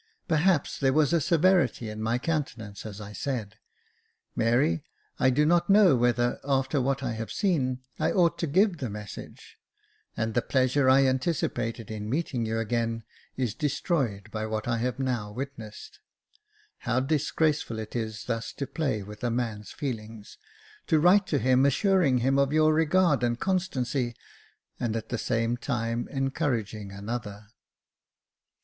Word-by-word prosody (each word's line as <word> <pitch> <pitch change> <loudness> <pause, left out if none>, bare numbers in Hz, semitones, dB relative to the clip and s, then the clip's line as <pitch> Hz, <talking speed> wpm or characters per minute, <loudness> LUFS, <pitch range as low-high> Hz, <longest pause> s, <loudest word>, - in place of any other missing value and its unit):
Perhaps 165 -1 +2
there 135 -2 +2
was 155 +2 +3
a 170 - +3
severity 170 -7 +2
in 110 0 -6
my 115 +2 +1
countenance 120 - -3
as 105 -1 -8
I 105 0 -8
said, 110 -5 -4 0.4
" - - -45
Mary, 115 - +2 0.4
I 130 - +4
do 145 +4 +3
not 175 +3 +3
know 195 -7 +6
whether, 120 0 +1
after 135 0 +1
what 135 0 0
I 120 - -1
have 110 0 -5
seen, 130 -10 0 0.2
I - - +2
ought 175 -3 +2
to 170 - -1
give 185 +5 +3
the 130 - -3
message; 105 0 -9 0.6
and 110 0 -1
the 120 - +2
pleasure 130 +1 +2
I 135 +1 +6
anticipated 130 -5 -1
in 105 -1 -5
meeting 130 -4 -1
you 110 0 -1
again 115 0 -1 0.3
is 125 -5 -1
destroyed 130 - -1
by 110 0 -3
what 110 0 -3
I 115 -1 0
have 125 +2 -1
now 125 -6 -2
witnessed. 115 -3 -8 0.8
How 125 - 0
disgraceful 150 -2 0
is 110 0 -4
it - - -15
thus 115 -2 -3
to 140 - -4
play 135 -6 -2
with 105 +3 -11
a 120 - +1
man's 115 -3 -3
feelings 110 -5 -6 0.2
— 430 -1 -25
to 160 -3 +4
write 185 +5 +5
to 145 - +1
him, 130 0 +3
assuring 150 -1 +3
him 135 +3 +2
of 140 0 +2
your 155 0 +4
regard 160 -1 +3
and 120 -1 0
constancy, 135 -10 -1 0.6
and 115 -2 -1
at 115 - -4
the 120 - -2
same 115 +1 0
time 120 -2 -2
encouraging 125 -7 -2
another." 105 0 -6
125 Hz, 160 wpm, -27 LUFS, 115-150 Hz, 0.8 s, know